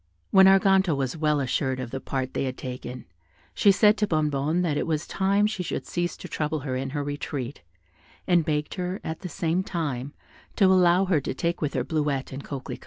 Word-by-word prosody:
When 190 -1 +7
Arganto 195 -3 +4
was 135 0 -2
well 150 -2 +1
assured 130 0 -1
of 125 -2 -5
the 135 - -3
part 130 -1 -3
they - - -1
had 130 -1 -4
taken, 125 -1 -7 0.5
she 200 - +5
said 210 +2 +4
to 210 - +1
Bonnebonne 155 0 0
that 160 -4 0
it - - -1
was 155 -1 -1
time 200 +2 +1
she 210 -3 -2
should 180 - -4
cease 175 0 -2
to - - -9
trouble 150 -1 -2
her 130 -2 -3
in 135 +1 -3
her 145 +1 -3
retreat, 145 - -5 0.6
and 175 -3 +3
begged 150 -1 -1
her, 180 +1 -3
at 160 0 -4
the 180 - -6
same 165 +3 0
time, 145 - -3 0.4
to 200 - +4
allow 185 0 +5
her 175 -6 +2
to - - -4
take 170 +4 -2
with 150 -2 -2
her - - +1
Bleuette 150 -4 -1
and 135 +1 -6
Coquelicot. 135 -2 -6
155 Hz, 210 wpm, -26 LUFS, 135-180 Hz, 0.6 s, When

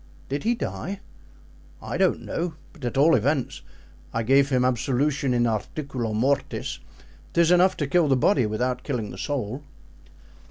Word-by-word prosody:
"Did 140 +2 -2
he 235 +1 +3
die?" 200 -4 -4 0.8
"I - - -5
don't - - +2
know. 170 -2 -3 0.2
But, 155 - -16
at 120 - -2
all 155 +4 +5
events, 135 +2 0 0.5
I 115 - -1
gave 135 +4 +4
him 125 -2 +2
absolution 130 +3 +1
in 120 -1 +2
articulo 120 +1 -3
mortis. 135 +6 -1 0.5
'Tis 170 0 +4
enough 180 +1 +4
to 145 - 0
kill 165 +3 +3
the 135 -2 +3
body, 125 - +3
without 125 +4 -1
killing 110 -5 -3
the - - -9
soul." 135 -1 -3
135 Hz, 155 wpm, -25 LUFS, 120-155 Hz, 0.8 s, all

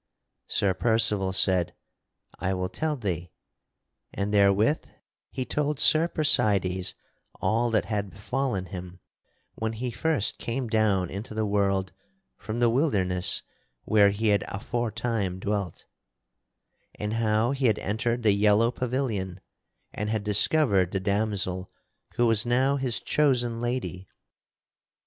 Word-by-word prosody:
Sir 95 -2 +1
Percival 105 -2 +1
said, 95 -2 +2 0.6
"I 95 +2 -1
will 90 0 -2
tell 155 -1 -2
thee"; 90 -7 -3 0.8
and 100 +1 -3
therewith 100 +7 +3 0.5
he 130 - -4
told 150 0 -1
Sir 155 +2 +6
Percydes 100 - +1 0.4
all 115 +5 +1
that 110 -2 +1
had 100 -2 -2
befallen 105 -1 -3
him 90 -1 -9 0.5
when 110 0 -3
he 120 +2 -4
first 150 -4 -1
came 120 +1 -3
down 105 -5 +1
into 105 +3 -7
the 110 0 0
world 100 -2 0 0.4
from 110 +1 -5
the 120 -1 +4
wilderness 100 - +2 0.4
where 105 -2 +4
he 105 +2 0
had 100 -1 +2
aforetime 110 -2 -2
dwelt, 100 -2 -3 1.1
and 105 +1 -4
how 110 +1 +1
he 135 -2 +1
had 110 -2 +2
entered 115 +4 -2
the 105 -2 +4
yellow 105 +3 +3
pavilion 115 -8 -3 0.5
and 105 +1 -3
had 110 -2 -1
discovered 105 - +3
the 95 - 0
damosel 100 -2 -1 0.5
who 120 - +2
was 115 -2 +3
now 130 +3 +2
his 130 -4 0
chosen 120 -6 +1
lady. 120 -7 -3
105 Hz, 125 wpm, -26 LUFS, 100-120 Hz, 1.1 s, Sir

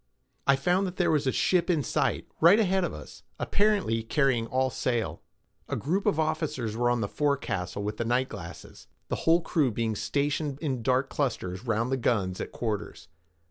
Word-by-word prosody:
I 140 - +6
found 180 +8 +1
that 180 - -6
there 175 -3 +2
was 150 -3 +1
a - - +3
ship 180 +4 +2
in 160 -5 +2
sight, - - 0
right 175 +7 +7
ahead 190 -3 +2
of 175 - -1
us—apparently 195 - -1
carrying 125 -1 +1
all 130 +2 +1
sail. 120 -3 -2 0.5
A - - -1
group 180 +8 -1
of 155 - +2
officers 150 -8 -1
were 120 +1 +2
on 120 -1 +1
the 100 - 0
forecastle 100 -10 -1
with 105 +1 -4
night 125 +3 +1
glasses, 90 -7 -10 0.2
the - - 0
whole 170 +1 +6
crew 155 -4 +1
being 110 -1 -1
stationed 145 +3 -1
in 135 -6 -2
dark 130 +2 +1
clusters 115 -6 -2
round 115 +3 0
the 135 - +1
guns 100 -7 0
at - - -5
quarters. 110 -4 -4
130 Hz, 180 wpm, -28 LUFS, 115-155 Hz, 0.5 s, right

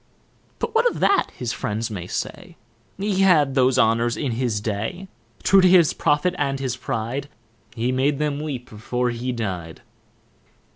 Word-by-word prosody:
But 455 - -3
what 465 +2 +4
of - - -7
that, 400 - +3
his 120 -1 -3
friends 110 +2 -3
may 90 -4 -5
say, - - -5 0.4
He 195 0 -1
had 155 -8 +4
those 130 -1 +3
honours 115 0 +2
in 140 -4 -2
his 115 -2 -1
day. 110 - -4 0.4
True 195 0 +6
to 185 - +6
his 175 -4 +5
profit 150 +5 +1
and 140 -2 0
his 130 -3 -2
pride, 130 +2 -4 0.5
He 120 +2 0
made 135 +3 +1
them 150 -1 -1
weep 140 -5 -5
before 120 +3 -2
he 120 +2 -3
dy'd. 95 -9 -5
130 Hz, 160 wpm, -23 LUFS, 115-150 Hz, 0.5 s, True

